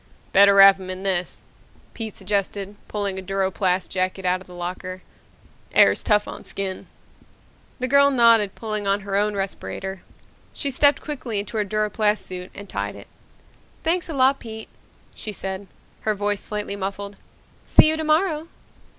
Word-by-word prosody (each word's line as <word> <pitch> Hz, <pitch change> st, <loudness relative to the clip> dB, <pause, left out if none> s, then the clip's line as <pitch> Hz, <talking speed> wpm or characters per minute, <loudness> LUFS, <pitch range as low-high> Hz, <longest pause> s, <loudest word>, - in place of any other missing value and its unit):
"Better 200 Hz, 0 st, +7 dB
wrap 195 Hz, 0 st, +9 dB
him 185 Hz, -1 st, -8 dB
in 185 Hz, +1 st, -6 dB
this," 185 Hz, -2 st, -2 dB, 0.5 s
Pete 220 Hz, -3 st, -5 dB
suggested, 200 Hz, +1 st, -2 dB
pulling 200 Hz, -2 st, -2 dB
a -, -, -6 dB
duroplast 190 Hz, -1 st, -1 dB
jacket 185 Hz, 0 st, -2 dB
out 185 Hz, +1 st, +1 dB
of 190 Hz, -, -15 dB
the 180 Hz, -, -12 dB
locker. 185 Hz, +1 st, -6 dB, 0.7 s
"Air's -, -, +5 dB
tough 210 Hz, -1 st, +2 dB
on -, -, -8 dB
skin." 195 Hz, -1 st, -5 dB, 0.9 s
The 255 Hz, -, -2 dB
girl 280 Hz, +1 st, +5 dB
nodded, 230 Hz, -6 st, +4 dB
pulling 215 Hz, -2 st, -3 dB
on 200 Hz, +1 st, +2 dB
her 195 Hz, 0 st, -4 dB
own 210 Hz, +1 st, +1 dB
respirator. 195 Hz, 0 st, -4 dB, 0.5 s
She 280 Hz, -, -1 dB
stepped 285 Hz, +2 st, +4 dB
quickly 260 Hz, -7 st, -4 dB
into 205 Hz, +2 st, -3 dB
her 210 Hz, -, +2 dB
duroplast 210 Hz, +1 st, 0 dB
suit 180 Hz, 0 st, -6 dB
and 205 Hz, 0 st, -8 dB
tied -, -, -4 dB
it. -, -, -13 dB, 0.7 s
"Thanks 345 Hz, +2 st, 0 dB
a -, -, -3 dB
lot, 270 Hz, +1 st, +4 dB
Pete," 220 Hz, -1 st, -8 dB, 0.4 s
she 215 Hz, -, -5 dB
said, 195 Hz, 0 st, -6 dB, 0.3 s
her 215 Hz, -1 st, -1 dB
voice 205 Hz, 0 st, -1 dB
slightly 210 Hz, -1 st, -2 dB
muffled. 200 Hz, +1 st, -5 dB, 0.5 s
"See -, -, +7 dB
you 315 Hz, -, +3 dB
tomorrow." 315 Hz, +1 st, +1 dB
200 Hz, 160 wpm, -23 LUFS, 190-225 Hz, 0.9 s, wrap